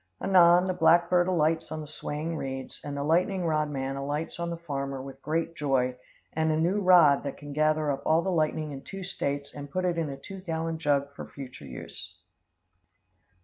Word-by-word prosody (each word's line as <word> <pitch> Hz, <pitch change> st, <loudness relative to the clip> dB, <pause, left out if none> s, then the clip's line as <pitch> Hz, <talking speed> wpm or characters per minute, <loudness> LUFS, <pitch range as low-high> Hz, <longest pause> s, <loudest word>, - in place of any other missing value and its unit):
Anon, 180 Hz, -1 st, +6 dB
the 185 Hz, -, 0 dB
black 170 Hz, 0 st, +4 dB
bird 175 Hz, 0 st, +4 dB
alights 160 Hz, -3 st, +1 dB
on 155 Hz, -, -3 dB
the 155 Hz, -, -6 dB
swaying 155 Hz, +2 st, -4 dB
reeds, 135 Hz, -3 st, -5 dB
and 145 Hz, -1 st, -5 dB
the 140 Hz, -, -1 dB
lightning 180 Hz, +4 st, +1 dB
rod 155 Hz, -2 st, +1 dB
man 135 Hz, -1 st, -3 dB
alights 145 Hz, +5 st, -3 dB
on 170 Hz, 0 st, -2 dB
the 170 Hz, -, -4 dB
farmer 140 Hz, -4 st, -4 dB
with 135 Hz, 0 st, -9 dB
great 165 Hz, +2 st, -1 dB
joy 130 Hz, -4 st, +1 dB, 0.4 s
and 160 Hz, 0 st, +1 dB
a 155 Hz, -, +1 dB
new 185 Hz, +6 st, +1 dB
rod 175 Hz, -7 st, +6 dB
that 140 Hz, -, -5 dB
can 145 Hz, -1 st, -8 dB
gather 155 Hz, 0 st, +2 dB
up 135 Hz, -, -3 dB
all 160 Hz, +2 st, +3 dB
the 190 Hz, -, -1 dB
lightning 155 Hz, -2 st, 0 dB
in 135 Hz, -1 st, -7 dB
two 195 Hz, +4 st, -8 dB
States 140 Hz, -6 st, -3 dB
and 145 Hz, -1 st, -8 dB
put 185 Hz, +5 st, -1 dB
it 175 Hz, -2 st, 0 dB
in 160 Hz, -3 st, -1 dB
a 135 Hz, -, -6 dB
two 195 Hz, +7 st, -9 dB
gallon 165 Hz, -2 st, -3 dB
jug 140 Hz, -2 st, +1 dB
for -, -, -8 dB
future 130 Hz, -, -10 dB
use. 60 Hz, -2 st, -8 dB
155 Hz, 205 wpm, -28 LUFS, 140-170 Hz, 0.4 s, Anon